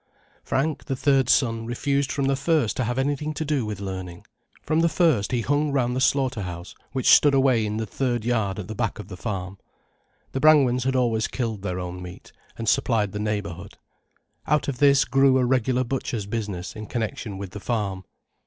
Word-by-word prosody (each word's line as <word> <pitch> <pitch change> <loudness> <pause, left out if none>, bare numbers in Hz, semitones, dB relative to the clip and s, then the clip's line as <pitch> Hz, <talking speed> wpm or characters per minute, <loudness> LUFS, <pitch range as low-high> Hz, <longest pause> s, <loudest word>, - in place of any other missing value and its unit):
Frank, 150 +3 -1
the 135 - -2
third 135 -2 +2
son, 115 -3 +2
refused 140 +3 -1
from 140 -2 -1
the 135 0 +2
first 140 -4 +1
to 130 - -1
have 120 +2 -2
anything 145 +3 -1
to 155 - -3
do 140 -6 0
with 105 -2 -5
learning. 95 -3 -6 0.4
From 155 +1 +1
the 170 0 +3
first 155 - +2
he 125 -2 +1
hung 145 +4 +1
round 125 -3 0
the 130 - -1
slaughter 130 -4 +1
house 90 -1 -7 0.2
which 130 -1 +2
stood 145 -2 +6
away 130 -4 +3
in 105 +1 -3
the 110 - -2
third 120 +1 -2
yard 110 -5 0
at 105 - -6
the 110 - -5
back 110 0 -2
of 95 - -9
the 95 - -7
farm. 95 -1 -5 0.7
The 135 - -2
Brangwens 135 -5 +4
had 130 0 +1
always 115 -3 +1
killed 115 -5 -3
their 90 -2 -3
own 90 0 -6
meat, 90 0 -10 0.3
and 115 - -5
supplied 105 -2 +2
the 105 - -5
neighbourhood. 100 -3 -4 0.7
Out 150 -1 +1
of 135 -3 -3
this 140 -1 +5
grew 135 +1 +4
a 130 - +2
regular 130 0 +1
butcher's 120 -4 -3
business 100 -4 -4
in 110 -1 -7
connection 115 -3 -4
with 95 -2 -7
the 105 - -7
farm. 100 -4 -2
120 Hz, 200 wpm, -24 LUFS, 105-135 Hz, 0.7 s, stood